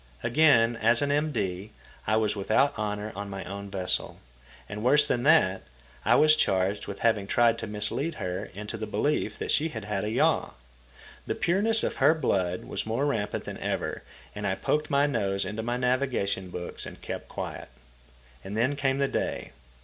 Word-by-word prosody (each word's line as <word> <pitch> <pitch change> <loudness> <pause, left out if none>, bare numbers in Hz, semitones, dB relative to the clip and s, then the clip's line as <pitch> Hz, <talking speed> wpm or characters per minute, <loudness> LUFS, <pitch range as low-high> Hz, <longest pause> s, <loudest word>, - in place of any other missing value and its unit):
Again, 120 -3 +4
as 115 +3 +3
an 140 - 0
M.D., 110 -11 -1 0.4
I 110 - +3
was 110 -1 +1
without 110 +8 +2
honour 105 0 -3
on 100 0 -5
my 95 -1 -5
own 100 +1 -7
vessel; 95 -2 -2 0.5
and, 105 0 -6
worse 140 +6 +5
than 120 - 0
that, 130 -10 +4 0.4
I - - +4
was 155 0 +6
charged 95 -6 +1
with 100 - -7
having 110 -4 +2
tried 115 +1 +3
to 115 - -4
mislead 105 +10 -2
her 90 +3 -3
into 105 +3 -5
the 110 0 -5
belief 150 - 0
that - - -3
she 160 +3 +2
had 110 -8 -7
had 105 -2 -2
a 105 - -1
yaw. 110 - +1 0.7
The - - -1
pureness 215 +5 +2
of - - -2
her 140 +4 +5
blood 95 - 0
was - - -3
more 115 +6 0
rampant 110 -8 -1
than - - -7
ever, - - -2 0.3
and - - -3
I - - 0
poked 150 0 -1
my 140 +1 +3
nose 100 -8 0
into 105 +1 -4
my 120 +2 -2
navigation 125 -7 0
books 90 0 -6
and - - -10
kept - - -6
quiet. - - -6 0.7
And 100 +3 -5
then 130 +5 +2
came 135 -1 0
the 140 0 +2
day. - - -3
110 Hz, 185 wpm, -27 LUFS, 100-140 Hz, 0.7 s, was